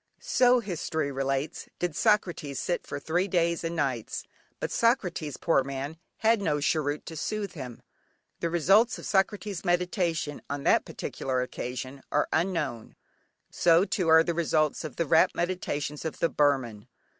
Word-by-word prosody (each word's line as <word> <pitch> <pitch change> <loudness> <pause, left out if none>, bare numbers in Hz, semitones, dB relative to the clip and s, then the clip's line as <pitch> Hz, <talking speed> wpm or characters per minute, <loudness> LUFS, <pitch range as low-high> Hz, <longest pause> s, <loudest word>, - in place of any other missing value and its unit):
So, 250 -1 +4
history 160 -7 -2
relates, 135 +2 -2
did 175 -3 -2
Socrates 175 - +1
sit 175 - -2
for 140 - -4
three 175 +6 0
days 170 -3 +1
and 165 0 -2
nights, 130 -8 -2 0.4
but - - -3
Socrates, 180 - +1
poor 150 -5 +2
man, 140 +4 -5 0.2
had 225 -1 +3
no 150 -6 +1
cheroot 145 0 0
to 165 - -7
soothe 210 +5 -3
him. 130 -8 -8 0.6
The 170 - -1
results 195 +8 +4
of - - -9
Socrates' 200 -1 0
meditation 175 -4 0
on 145 -1 -3
that - - +4
particular 130 -1 -3
occasion 130 +2 -6
are 150 - +2
unknown; 155 -9 -1 0.6
so 170 +2 +4
too 185 -5 -1
are 160 0 +7
the 170 - -1
results 155 -2 +1
of 155 -4 -6
the 170 - 0
rapt 160 +2 +4
meditations 150 -5 -2
of 160 - -4
the 165 - +1
Burman. 130 -8 +1
160 Hz, 155 wpm, -28 LUFS, 140-180 Hz, 0.6 s, are